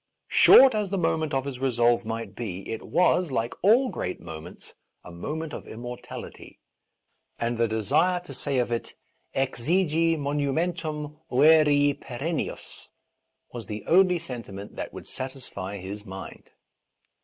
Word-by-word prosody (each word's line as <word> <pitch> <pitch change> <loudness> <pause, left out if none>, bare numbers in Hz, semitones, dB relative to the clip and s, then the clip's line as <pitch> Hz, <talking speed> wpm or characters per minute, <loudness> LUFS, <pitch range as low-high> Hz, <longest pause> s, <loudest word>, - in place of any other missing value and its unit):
Short 265 -1 +8
as 210 -2 -1
the 195 - -1
moment 160 -3 0
of 135 -1 0
his 135 -3 -5
resolve 120 -2 +2
might 115 +1 -4
be, 95 -5 -6
it 110 - -4
was, 180 -1 +2
like 120 -2 -1
all 235 +7 +5
great 90 - -4
mo 80 -2 -8
^ - - -13
ments, 90 - -11 0.3
a 90 - -11
moment 150 - -5
of - - -7
immortality, 120 +2 -9 0.8
and 120 +1 -1
the 115 0 +2
desire 110 - +1
to 160 -6 -10
say 135 +1 -2
of. 120 -1 0
it 115 - -3 0.4
exegi 160 +5 +1
monumentum 150 +1 -2
cere 145 +1 +5
perennius 140 +6 -5 0.6
was 115 -4 -7
the 105 -1 -6
only 180 +1 +5
sentiment 115 -10 -8
that - - -5
would - - -9
satisfy 130 -7 -6
his 100 +2 -7
mind. 95 -2 -9
135 Hz, 145 wpm, -26 LUFS, 115-160 Hz, 0.8 s, Short